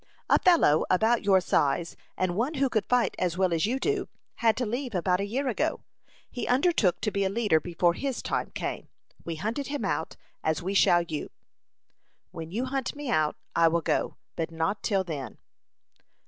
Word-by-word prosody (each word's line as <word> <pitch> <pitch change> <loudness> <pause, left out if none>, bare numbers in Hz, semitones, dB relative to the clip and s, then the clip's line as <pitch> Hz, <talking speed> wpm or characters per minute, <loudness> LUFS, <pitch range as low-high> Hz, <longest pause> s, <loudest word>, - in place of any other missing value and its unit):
A - - +6
fellow 330 - +5
about 220 +5 +3
your 195 -2 +5
size, 165 -1 0 0.2
and 185 -1 0
one 255 - -1
who 270 -1 +1
could 215 -3 -1
fight 250 -1 +2
as 180 -1 0
well 185 -2 +2
as 165 +4 +1
you 255 +4 -1
do, 415 +6 -1 0.3
had 225 -2 +2
to 250 - 0
leave 245 +1 -3
about 180 +1 +1
a 200 - -2
year 265 +6 -2
ago. 245 - -1 0.5
He 245 - -4
undertook 250 - +2
to 210 - 0
be 200 0 0
a 190 - +1
leader 205 -6 +2
before 175 +1 +1
his 270 +6 -3
time - - -2
came. - - -4 0.4
We 165 - -4
hunted 225 - -3
him 290 0 -3
out, - - -2 0.3
as 160 0 +1
we 190 +3 -2
shall 175 -3 +5
you." 160 -3 -5 1.0
"When 165 -1 -7
you 230 +9 -2
hunt 265 0 -3
me 290 -2 -4
out, 155 -1 +2 0.2
I 165 0 +5
will 170 +1 +1
go, - - -1 0.2
but 165 -1 -2
not 165 +5 -2
till 195 -4 +1
then." 145 - -6
195 Hz, 190 wpm, -27 LUFS, 170-250 Hz, 1.0 s, A